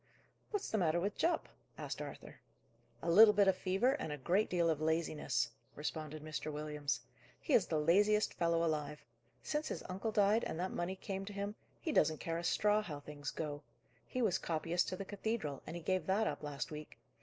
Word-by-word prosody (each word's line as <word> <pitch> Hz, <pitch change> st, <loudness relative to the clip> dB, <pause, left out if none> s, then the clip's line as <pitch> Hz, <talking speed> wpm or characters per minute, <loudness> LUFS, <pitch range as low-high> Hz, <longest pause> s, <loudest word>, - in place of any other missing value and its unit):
"What's 415 Hz, -2 st, -3 dB
the 220 Hz, -, +2 dB
matter 170 Hz, -1 st, +2 dB
with 200 Hz, +3 st, -1 dB
Jupp?" 335 Hz, -1 st, +1 dB, 0.3 s
asked -, -, -4 dB
Arthur. -, -, -8 dB, 0.6 s
"A 170 Hz, -, +1 dB
little 210 Hz, +4 st, +9 dB
bit 200 Hz, -1 st, +5 dB
of 190 Hz, -, +5 dB
fever, 195 Hz, +7 st, +2 dB
and 160 Hz, -, -3 dB
a 150 Hz, -, -3 dB
great 185 Hz, +10 st, +2 dB
deal 175 Hz, -2 st, +2 dB
of 155 Hz, -2 st, +1 dB
laziness," 155 Hz, -7 st, 0 dB, 0.2 s
responded 155 Hz, 0 st, -4 dB
Mr. 155 Hz, 0 st, -4 dB
Williams. 150 Hz, -1 st, -2 dB, 0.4 s
"He 305 Hz, -, -2 dB
is 215 Hz, -, +5 dB
the 160 Hz, -, 0 dB
laziest 205 Hz, +7 st, +4 dB
fellow 170 Hz, 0 st, +2 dB
alive. 150 Hz, -2 st, -2 dB, 0.4 s
Since 305 Hz, +1 st, -1 dB
his -, -, -4 dB
uncle 195 Hz, +5 st, -2 dB
died, 210 Hz, +1 st, +4 dB
and 160 Hz, -, -3 dB
that 185 Hz, +1 st, -1 dB
money 175 Hz, +2 st, -2 dB
came 195 Hz, 0 st, -4 dB
to 205 Hz, -, -7 dB
him, 200 Hz, +1 st, -3 dB, 0.3 s
he 320 Hz, -, -2 dB
doesn't 155 Hz, -, +3 dB
care 165 Hz, +2 st, -2 dB
a -, -, -5 dB
straw 210 Hz, +4 st, +3 dB
how 155 Hz, -9 st, -6 dB
things 145 Hz, 0 st, -6 dB
go. 145 Hz, -2 st, -4 dB, 0.5 s
He 255 Hz, -, -1 dB
was 190 Hz, -4 st, +2 dB
copyist 165 Hz, +2 st, 0 dB
to 185 Hz, -, -3 dB
the 195 Hz, -, -5 dB
cathedral, 205 Hz, -, -3 dB
and -, -, -5 dB
he 170 Hz, -, -6 dB
gave 185 Hz, -2 st, 0 dB
that 200 Hz, +4 st, +3 dB
up -, -, -2 dB
last 145 Hz, +2 st, -4 dB
week. 150 Hz, 0 st, -8 dB
175 Hz, 200 wpm, -36 LUFS, 155-205 Hz, 0.6 s, little